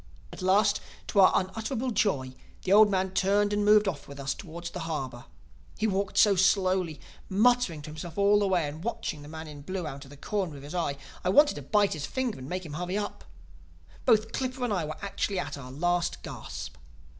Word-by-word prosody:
"At - - -9
last, 200 +2 +3 0.3
to 200 - +2
our 190 - +8
unutterable 225 +6 -1
joy, 135 - 0 0.3
the 190 - +2
old 210 0 +8
man 190 -1 0
turned 200 +2 +2
and 205 0 +1
moved 210 0 +5
off 165 -7 -3
with 140 0 -10
us 135 -1 -1
towards 170 -1 -8
the 180 - -6
harbor. 130 -6 -4 0.5
He 215 - 0
walked 200 -1 -1
so 205 -2 +6
slowly, 185 -4 +2 0.3
muttering 210 -6 +3
to 150 - -8
himself 160 +2 -8
all 200 +1 +5
the 205 - +2
way 180 -5 +2
and 155 +3 -7
watching 190 -8 -3
the 145 - -10
man 160 +1 -8
in 145 -1 -9
blue 185 +3 -4
out 140 -2 -6
of 135 - -14
the 145 - -13
corner 185 -2 -3
of 140 - -11
his 145 - -8
eye, 170 -5 0
that - - -14 0.3
I - - +3
wanted 290 +10 +6
to 145 - -7
bite 205 +8 +2
his 150 -3 -4
finger 260 -3 -2
to - - -10
make 180 +7 -4
him 150 - -8
hurry 180 +5 -2
up. 205 -1 -4 0.8
Both 220 0 +3
Clippa 255 0 -3
and 240 -4 0
I 175 -5 0
were 155 +1 -6
actually 200 0 -2
at - - -3
our 135 -3 -9
last 175 +4 0
gasp. - - -7
185 Hz, 220 wpm, -28 LUFS, 150-205 Hz, 0.8 s, our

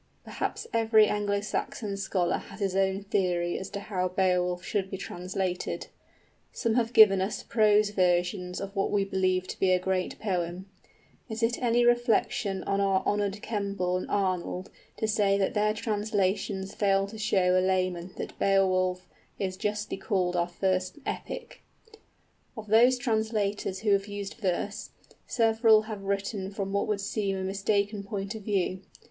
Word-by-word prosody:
Perhaps - - -4
every 220 -1 +5
Anglo 205 -1 0
Saxon 210 0 -3
scholar 185 -3 0
has - - -12
his 195 -2 -1
own 195 0 +1
theory 180 -3 0
as 190 - -6
to 200 - -5
how 185 -3 -1
Beowulf 180 -1 +1
should 195 -2 -1
be 195 - -4
translated. 185 0 -4 0.6
Some 230 -3 -1
have 230 -1 +1
given 210 -5 +7
us 195 +3 -2
prose 210 -2 +3
versions 180 -1 +1
of 200 +1 -6
what 195 - +1
we 200 -1 +1
believe 185 -1 0
to - - -6
be 190 - +3
a 185 - +5
great 185 0 -2
poem. 180 -2 -2 0.6
Is 225 +1 -4
it 235 +3 +1
any 240 0 +3
reflection 230 -5 +1
on 200 0 0
our 195 -1 +2
honored 205 0 -1
Kemble 200 -4 -1
and 185 - -3
Arnold 185 -2 -1 0.3
to 220 - -1
say 205 -2 +2
that 195 -1 0
their 210 0 +2
translations 205 -2 -1
fail 195 -1 +2
to 215 +2 -9
show 190 -4 +2
a 185 - +4
layman 185 -1 0
that - - -6
Beowulf 185 -2 +2 0.3
is 190 -2 -2
justly 210 +1 -3
called 185 -2 0
our 175 0 +1
first 185 +2 -1
epic? - - -6 1.0
Of 220 - -6
those 240 +4 +6
translators 220 -5 -1
who 215 -2 +1
have 200 0 +2
used 205 -1 -5
verse, 200 0 -3 0.4
several 225 -1 +4
have 215 -2 -6
written 195 0 -2
from 195 -1 -4
what 200 - 0
would 210 -2 -1
seem 200 -1 -1
a 190 - -3
mistaken 200 +2 0
point 200 0 -4
of 220 - -7
view. 195 -2 -1
195 Hz, 160 wpm, -28 LUFS, 185-210 Hz, 1.0 s, given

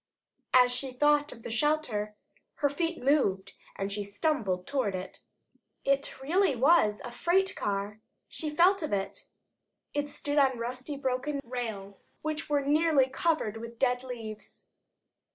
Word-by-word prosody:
As 250 -1 +7
she 255 +1 -2
thought 295 +2 +3
of 230 - -13
shelter, 235 -7 0 0.4
her 285 -1 +1
feet 330 0 -2
moved, 200 -9 +2 0.2
and 195 +1 -3
she 205 0 -2
stumbled 200 - -1
toward 255 -9 -1
it. 185 +1 -7 0.6
It 275 0 0
really 345 +1 +2
was 250 -5 +4
a 245 - -6
freight 360 +10 +1
car. 205 +1 -3 0.3
She 310 - -4
felt 350 +6 +4
of 310 - -3
it. 195 -1 -3 0.7
It 290 0 -1
stood 290 0 -1
on 265 -3 +3
rusty 255 +5 -4
broken 270 +2 -1
rails 220 -5 -6
which 310 0 -3
were 290 -1 +2
nearly 295 -2 +3
covered 265 -6 0
with 230 +1 -8
dead 250 -1 +2
leaves. 225 -4 -8
260 Hz, 140 wpm, -29 LUFS, 215-295 Hz, 0.7 s, As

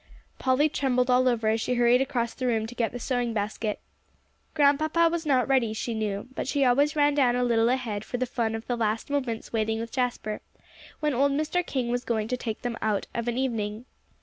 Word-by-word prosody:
Polly 260 +3 +3
trembled 255 -4 +1
all 255 +1 +4
over 230 -3 0
as 220 +1 +2
she 250 - 0
hurried 240 +1 +4
across 245 -4 -1
the 255 - -3
room 225 -2 +1
to 225 - -8
get 235 -2 -1
the 245 - -5
sewing 245 -2 -1
basket. 210 +1 -2 0.8
Grandpapa 310 +3 +3
was 335 -2 -3
not 260 -3 +3
ready, 255 -5 +2
she 230 +2 -3
knew; 210 -1 -3
but - - -4
she 275 0 +2
always 285 +5 +3
ran 290 -1 +3
down 260 -4 +3
a 250 - +1
little 230 -1 +3
ahead 235 -5 -1
for 245 - -4
the 255 - 0
fun 230 -3 -1
of 225 - -6
the 245 - -1
last 225 +2 -1
moments 250 -7 -2
waiting 220 0 0
with 230 0 -5
Jasper, 245 -4 -2 0.6
when 300 -1 +1
old 275 +3 +2
Mr. 310 +5 0
King 255 -7 -2
was 245 +1 -1
going 220 -2 -1
to 250 - 0
take 230 -3 -5
them 240 -1 -3
out 215 -2 0
of 235 0 -3
an 240 0 -1
evening. 225 -3 -2
245 Hz, 220 wpm, -27 LUFS, 225-265 Hz, 0.8 s, all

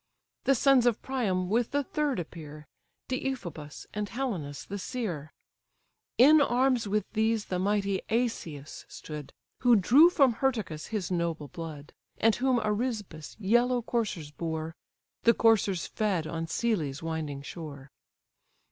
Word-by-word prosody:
The 275 - +4
sons 260 -1 +4
of 235 - +2
Priam 200 -9 -1
with 230 +4 +1
the 285 0 0
third 290 -4 -1
appear, 155 -3 -8 0.4
Deiphobus, 200 - -4
and 210 -1 -3
Helenas 185 - -4
the 200 +1 -5
seer; 180 - -4 0.9
In 295 +5 +7
arms 255 -3 +2
with 210 +1 0
these 220 0 +1
the 180 - -2
mighty 200 0 0
Asius 195 - -2
stood, 150 -2 -8 0.3
Who 245 -2 +5
drew 260 - +7
from 275 -8 +4
Hyrtacus 220 - -1
his 200 -5 -3
noble 170 -4 -2
blood, 155 -1 -8 0.2
And 225 0 +4
whom 255 0 +2
Arisba's 210 -7 -3
yellow 240 +4 +2
coursers 205 -11 -2
bore, 160 0 -4 0.5
The 235 - +5
coursers 205 -5 +3
fed 200 -7 -1
on 165 +1 -4
Sellè's 165 - -1
winding 155 -4 -4
shore. 140 -4 -8
205 Hz, 130 wpm, -29 LUFS, 160-240 Hz, 0.9 s, In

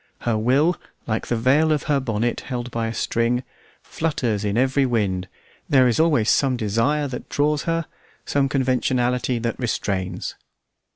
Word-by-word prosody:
Her 120 -2 0
will, 135 +10 +2 0.3
like 110 -1 -2
the 120 - 0
veil 140 +7 +3
of 150 -2 +1
her 145 -2 +1
bonnet, 115 -2 -1
held 125 -2 -5
by 115 -1 -1
a 115 - -3
string, 120 +2 0 0.4
flutters 125 -10 -1
in 105 +1 -1
every 135 +2 +3
wind; 100 -7 0 0.4
there 130 -3 +5
is 120 - +1
always 150 -9 +3
some 130 0 +2
desire 115 +7 +1
that 125 -2 -7
draws 145 0 +1
her, 165 -1 0 0.4
some 140 -1 +1
conventionality 125 -2 +1
that 115 0 -3
restrains. 95 -6 -2
125 Hz, 155 wpm, -22 LUFS, 115-140 Hz, 0.4 s, there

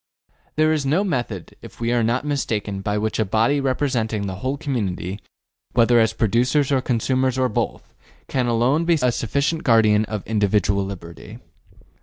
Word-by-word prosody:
There 155 0 +3
is 155 -2 0
no 155 +8 +1
method, 120 - -3
if - - -13
we 115 +1 0
are 120 - +2
not 120 +5 0
mistaken, 110 -9 -2
by 105 +1 -1
which 110 +1 -2
a - - +4
body 110 +8 +1
representing 125 -6 -1
the 95 -1 -5
whole 130 +7 -2
community, 100 - -3 0.5
whether 120 0 +4
as 110 -1 +3
producers 125 +6 +1
or 135 -2 +2
consumers 130 +1 0
or 130 -1 +1
both, - - -3 0.3
can 130 -2 -1
alone 120 +7 +2
be 170 -1 +3
a 125 -2 +2
sufficient 140 +8 -1
guardian 110 -3 +4
of 105 -2 -5
individual 100 -2 +1
liberty. 85 -6 -9
115 Hz, 165 wpm, -22 LUFS, 105-135 Hz, 0.5 s, a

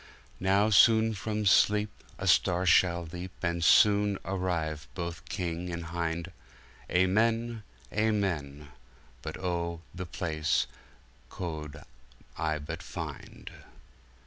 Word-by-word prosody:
Now 100 +3 +3
soone 110 +2 +6
from 105 +1 -3
SleepA 105 0 +2
Starre 95 -1 +3
shall 85 0 +4
leap, 90 0 -6
And 85 -1 0
soone 100 +4 +5
arrive 85 -5 -2
both 85 -3 -6
King 90 -2 -3
and 85 0 -5
Hinde:Amen, 95 +6 -1 0.3
Amen:But 75 - -3
O, 85 -2 -3
the 90 -1 -6
Place 80 -3 0 0.6
co'd 80 -4 -6 0.5
I 80 -1 -1
but 75 -1 -6
finde! - - -8
90 Hz, 95 wpm, -29 LUFS, 80-100 Hz, 0.6 s, soone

